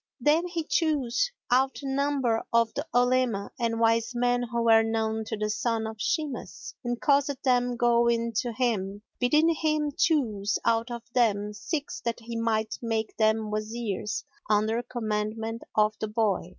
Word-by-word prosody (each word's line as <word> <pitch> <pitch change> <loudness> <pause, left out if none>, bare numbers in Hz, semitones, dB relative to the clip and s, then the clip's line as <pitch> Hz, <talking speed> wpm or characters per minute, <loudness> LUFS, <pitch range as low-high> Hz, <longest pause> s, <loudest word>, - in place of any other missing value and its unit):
Then 305 +7 +3
he 340 -2 -3
chose 310 - +1 0.2
out 265 +3 +2
a - - -3
number 270 -4 +1
of 230 -1 +3
the 290 +3 -4
Olema 245 -4 +2
and 230 -1 0
wise 230 +1 +2
men 245 0 +2
who 235 -1 -2
were 225 -1 +6
known 220 0 -1
to 215 - -4
the 210 0 -1
son 225 0 -1
of 220 -1 -6
Shimas, 295 -3 -3
and 240 -1 -2
caused 285 -1 +2
them 245 -1 +2
go 235 0 +3
in 230 0 0
to 240 +1 0
him, 210 -4 -1 0.2
bidding 300 +6 +4
him 305 -1 0
choose 215 - +1
out 230 +1 +2
of 235 -1 -6
them 210 -4 +2
six 285 - -4
that 235 0 -2
he 230 0 -7
might 220 -1 -1
make 225 -2 -2
them 220 -1 +2
Wazirs 215 -1 -3 0.3
under 215 +2 +2
commandment 220 -1 -3
of 215 0 +3
the 215 - -2
boy. 210 -5 0
230 Hz, 165 wpm, -27 LUFS, 220-255 Hz, 0.3 s, were